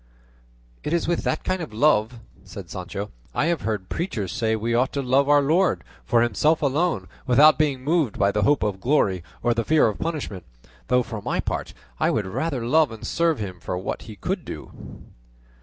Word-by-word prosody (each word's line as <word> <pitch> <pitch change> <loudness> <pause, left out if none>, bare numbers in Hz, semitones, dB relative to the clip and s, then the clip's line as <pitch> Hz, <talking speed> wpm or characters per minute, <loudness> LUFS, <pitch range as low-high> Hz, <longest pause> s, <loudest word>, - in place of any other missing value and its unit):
"It - - -2
is 170 - +1
with 175 0 0
that - - -1
kind 185 -1 -1
of 155 - -6
love," 120 -3 +3 0.3
said 100 -5 -10
Sancho, 95 +3 -5 0.2
"I - - +2
have 170 0 0
heard 105 -4 -3
preachers 110 - -3
say 110 +3 0
we 115 +2 -2
ought 125 +3 +2
to 140 - -1
love 135 +3 +2
our 145 -1 +5
Lord, 165 +6 +2 0.2
for 120 -2 +3
himself 150 +8 +2
alone, 155 +5 0 0.2
without 145 +6 +6
being 140 -4 +1
moved 150 - +1
by 100 - +3
the 105 - 0
hope 140 +7 +3
of 100 -3 -2
glory 100 - +2 0.2
or 120 0 +3
the 115 0 -1
fear 155 +5 +4
of 105 - -3
punishment; 145 - -4 0.4
though 125 0 +3
for 115 -3 -6
my - - -2
part, - - -3 0.2
I - - +3
would 105 - 0
rather 130 - -2
love 155 +2 +3
and 115 - -9
serve 165 -3 +1
him 95 -4 -6
for 90 - -4
what 95 - -4
he 110 - -10
could 95 - -3
do." - - -10
125 Hz, 200 wpm, -24 LUFS, 105-155 Hz, 0.4 s, without